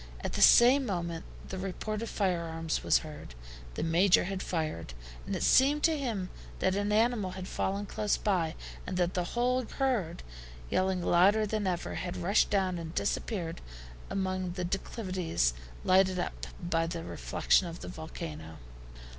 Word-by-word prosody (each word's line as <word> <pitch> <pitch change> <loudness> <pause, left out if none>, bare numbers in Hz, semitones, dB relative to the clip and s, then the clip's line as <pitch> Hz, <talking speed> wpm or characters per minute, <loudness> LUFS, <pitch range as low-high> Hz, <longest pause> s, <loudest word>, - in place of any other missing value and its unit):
At - - -4
the - - -1
same 255 +4 +7
moment 170 -4 -3 0.2
the 190 - -4
report 205 +3 -3
of 230 - -4
firearms 165 -4 -1
was - - +5
heard. 150 - -10 0.4
The - - -2
Major 175 +3 +4
had 190 +1 -3
fired, 155 - -3 0.3
and - - -2
it - - -2
seemed 285 +3 +4
to 325 - +4
him 225 -10 -3 0.3
that 190 - +1
an 205 +1 0
animal 215 -3 +2
had 185 0 -6
fallen 200 +1 -2
close 205 +1 0
by, 175 -6 0 0.3
and 185 - -3
that 175 0 +1
the 180 - 0
whole 250 +1 +2
herd, 230 - -1 0.5
yelling 185 -1 +1
louder 200 +6 +4
than 210 -1 -1
ever, 175 -1 -2
had 180 -1 -4
rushed 200 +5 +2
down 190 -3 +1
and 165 0 -7
disappeared 175 -7 -2 0.5
among 185 -2 -2
the 180 -1 -3
declivities 185 - -1 0.3
lighted 185 0 +4
up 180 - -4
by 165 -1 0
the 165 0 -4
reflection 180 - +1
of 170 0 -8
the - - -7
volcano. 155 - -7
185 Hz, 160 wpm, -30 LUFS, 170-205 Hz, 0.5 s, same